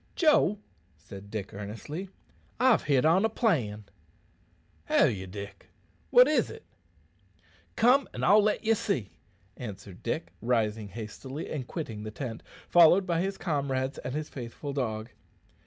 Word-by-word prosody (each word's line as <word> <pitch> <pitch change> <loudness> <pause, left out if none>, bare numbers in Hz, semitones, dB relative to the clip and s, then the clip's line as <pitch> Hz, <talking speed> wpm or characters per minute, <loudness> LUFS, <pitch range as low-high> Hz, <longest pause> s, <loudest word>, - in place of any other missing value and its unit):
"Joe," 305 - +4 0.4
said 100 +5 -11
Dick 105 -2 -5
earnestly, 115 - -6 0.5
"I've 255 -2 +4
hit 140 -2 +3
on 170 +5 +4
a 225 - +3
plan." 125 - 0 1.0
"Have - - +4
ye, 95 -2 -6
Dick 100 +1 -9 0.4
what - - +7
is't?" 270 -7 0 1.1
"Come 255 +3 +4
and - - -3
I'll 205 +3 +7
let 210 +1 0
ye 225 - +5
see," 165 - -2 0.5
answered 100 -5 -8
Dick, 85 +1 -3
rising 110 -2 0
hastily 115 +7 -7
and 135 -5 -4
quitting 115 -10 -5
the 110 - -5
tent, 115 0 -6 0.3
followed 175 +3 +6
by 170 -2 0
his 195 +1 -2
comrades 140 -5 -2
and 125 - -5
his 155 0 -3
faithful 130 +3 -7
dog. 115 -4 -3
130 Hz, 140 wpm, -29 LUFS, -, 1.1 s, what